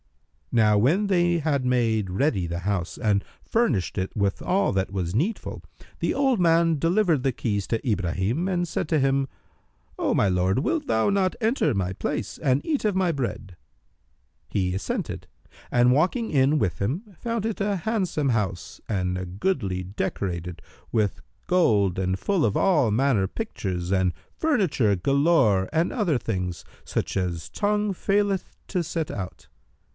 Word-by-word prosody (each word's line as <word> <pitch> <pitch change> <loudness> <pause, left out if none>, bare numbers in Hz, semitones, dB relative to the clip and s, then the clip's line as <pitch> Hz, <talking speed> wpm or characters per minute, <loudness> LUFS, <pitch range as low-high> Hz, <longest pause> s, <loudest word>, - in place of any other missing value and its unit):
Now 105 -3 +4
when 170 - +3
they 175 -3 +3
had 145 -4 0
made 115 -5 +1
ready 95 - +1
the 85 +1 -4
house 95 -2 -2
and 105 -4 +1 0.2
furnished 135 - 0
it 95 - -3
with 100 -1 0
all 195 - +1
that 95 0 -1
was 90 -3 -2
needful, 185 - -2 0.4
the - - 0
old 270 -5 +2
man 165 -1 +4
delivered 170 -2 +2
the 135 - +2
keys 105 -5 -2
to 115 +3 -1
Ibrahim 100 - 0
and 175 -2 0
said 160 - -3
to 155 - +3
him, 135 0 +2 0.7
"O - - +1
my 100 - +3
lord, 90 +3 +2
wilt 300 - -1
thou 110 - +2
not 195 -2 +1
enter 220 - +1
my 95 -2 -1
place - - -3
and 130 0 +1
eat 300 -4 0
of 210 -3 +1
my 185 -3 +2
bread?" 115 - -4 0.9
He 90 -3 0
assented 95 - -3 0.4
and 125 0 +4
walking 185 - +1
in 140 +1 +3
with 90 - -1
him, 130 - -1
found 230 -2 -2
it 225 -2 -2
a 200 0 +1
handsome 185 -8 -1
house 100 -7 -2
and 90 -3 -1
a 90 - -4
goodly, 95 - -1
decorated 90 -2 -4 0.3
with 105 -4 0 0.3
gold 105 - +3
and 95 0 0
full 195 - +1
of 105 -3 +2
all 160 - +3
manner 115 -4 +2
pictures 95 - -4
and 95 -2 +2 0.2
furniture 185 - +2
galore 130 - +3
and 165 +2 +1
other 190 - +1
things, 90 -7 -3 0.2
such - - -3
as 90 -4 -2
tongue 210 0 0
faileth 200 0 0
to 180 -3 -1
set 165 -1 -3
out. 95 -2 -7
130 Hz, 160 wpm, -25 LUFS, -, 0.9 s, Now